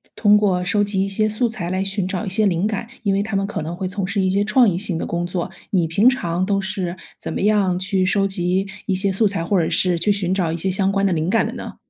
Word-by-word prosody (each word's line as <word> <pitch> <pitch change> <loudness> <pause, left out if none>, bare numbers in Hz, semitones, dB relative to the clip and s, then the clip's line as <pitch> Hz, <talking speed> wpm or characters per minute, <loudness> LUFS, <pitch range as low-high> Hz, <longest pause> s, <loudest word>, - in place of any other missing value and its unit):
通 210 -1 +4
过 190 -4 +2
收 205 +2 +2
集 195 -1 0
一 - - -3
些 215 +2 +1
素 225 +3 0
材 185 -6 -5
来 185 +1 -1
寻 195 -1 0
找 190 +3 -3
一 - - -3
些 205 +2 +3
灵 175 +1 0
感， 215 +1 -2 0.2
因 200 -2 +1
为 200 - +1
他 215 0 -3
们 195 0 +1
可 205 - -4
能 165 +3 -5
会 185 +1 -3
从 195 0 -3
事 200 +1 -2
一 190 - +1
些 200 +2 +1
创 230 +4 +4
意 190 - +1
性 185 -2 -2
的 - - -3
工 170 0 -2
作。 175 -1 -3 0.2
你 180 -4 +1
平 200 +9 +4
常 175 -9 -1
都 195 +1 +1
是 190 -2 -3 0.2
怎 - - -6
么 - - -3
样 200 -3 +2
去 190 0 0
收 195 +1 +2
集 190 0 0 0.2
一 195 - +1
些 195 +1 +2
素 210 +3 +2
材， 195 -4 -2
或 190 +2 +1
者 - - -1
是 180 -2 +2
去 205 +5 +2
寻 190 -3 +1
找 180 -4 0
一 165 - -3
些 190 +3 0
相 195 +1 +2
关 195 0 +1
的 190 - +2
灵 160 +1 -1
感 225 - +2
的 - - -4
呢？ - - -8
195 Hz, 315 characters per minute, -20 LUFS, 180-205 Hz, 0.2 s, 通